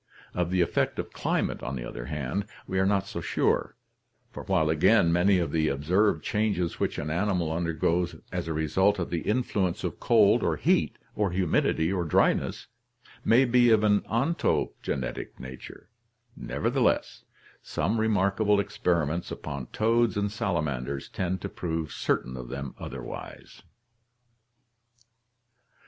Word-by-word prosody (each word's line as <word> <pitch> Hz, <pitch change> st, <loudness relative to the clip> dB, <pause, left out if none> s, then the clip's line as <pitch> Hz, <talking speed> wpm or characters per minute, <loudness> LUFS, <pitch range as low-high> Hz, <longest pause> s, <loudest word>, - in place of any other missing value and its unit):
Of 90 Hz, -1 st, -1 dB
the 90 Hz, 0 st, +2 dB
effect 85 Hz, -, 0 dB
of -, -, -5 dB
climate, -, -, -1 dB
on 65 Hz, +2 st, -4 dB
the -, -, -5 dB
other -, -, -7 dB
hand, 75 Hz, +7 st, -3 dB, 0.2 s
we 95 Hz, -, -1 dB
are 95 Hz, -, +3 dB
not 100 Hz, -1 st, +2 dB
so 85 Hz, -3 st, -5 dB
sure, -, -, 0 dB, 0.6 s
for -, -, -7 dB
while 90 Hz, -5 st, +2 dB
again 85 Hz, +3 st, +4 dB
many 95 Hz, +3 st, +4 dB
of 85 Hz, -2 st, -1 dB
the 80 Hz, -1 st, +1 dB
observed 90 Hz, +10 st, +1 dB
changes 105 Hz, -5 st, -1 dB
which -, -, -1 dB
an 75 Hz, +1 st, -3 dB
animal 90 Hz, -2 st, 0 dB
under 85 Hz, +1 st, -1 dB
goes 85 Hz, +2 st, 0 dB, 0.2 s
as -, -, -3 dB
a 80 Hz, -, -1 dB
result 95 Hz, +7 st, +2 dB
of 85 Hz, -, -3 dB
the 85 Hz, -, 0 dB
influence 105 Hz, -6 st, 0 dB
of -, -, -3 dB
cold -, -, +4 dB
or -, -, +1 dB
heat -, -, +1 dB, 0.2 s
or 105 Hz, -2 st, 0 dB
humidity 90 Hz, -1 st, +1 dB
or 90 Hz, -2 st, 0 dB
dryness 80 Hz, -, +1 dB, 0.6 s
may 125 Hz, +4 st, +5 dB
be 120 Hz, 0 st, +4 dB
of 110 Hz, -2 st, +4 dB
an 105 Hz, -1 st, +4 dB
ontogenetic 115 Hz, -, -1 dB
nature, 65 Hz, 0 st, -10 dB, 0.5 s
nevertheless, -, -, 0 dB, 0.4 s
some 110 Hz, +5 st, -1 dB
re 110 Hz, -, +2 dB
markable 105 Hz, 0 st, +2 dB
experiments 85 Hz, -5 st, -1 dB
upon 70 Hz, -4 st, -6 dB
toads 115 Hz, 0 st, +1 dB
and 100 Hz, 0 st, 0 dB
salamanders 75 Hz, -, -2 dB
tend 95 Hz, 0 st, -2 dB
to -, -, -3 dB
prove 80 Hz, -3 st, -4 dB
certain 65 Hz, 0 st, -1 dB
of 60 Hz, -1 st, -7 dB
them 70 Hz, 0 st, -5 dB
otherwise. -, -, -8 dB
90 Hz, 145 wpm, -27 LUFS, 80-105 Hz, 0.6 s, may